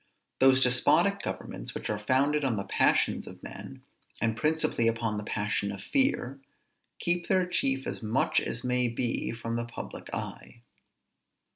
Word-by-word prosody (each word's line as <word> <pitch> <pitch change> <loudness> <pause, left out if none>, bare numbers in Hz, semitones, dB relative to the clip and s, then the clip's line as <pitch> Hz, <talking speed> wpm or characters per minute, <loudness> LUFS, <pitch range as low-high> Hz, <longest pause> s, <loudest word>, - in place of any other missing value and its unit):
Those 130 0 +6
despotic 125 0 +3
governments - - -5
which - - -4
are 105 - -2
founded 140 +7 +2
on 130 -4 +1
the 100 - -2
passions - - +2
of - - -11
men, - - -9 0.4
and 115 -1 0
principally 155 -3 +1
upon 115 -2 0
the - - -6
passion 105 -1 -1
of 100 -1 -8
fear, 200 - +1 0.6
keep 175 0 +1
their 185 -1 +3
chief 135 -6 +1
as - - -4
much 110 +3 +1
as 115 - -4
may 125 0 +2
be 120 0 -1
from 115 0 -4
the 120 - -2
public 120 - -8
eye. 120 - -6
120 Hz, 155 wpm, -29 LUFS, 115-135 Hz, 0.6 s, Those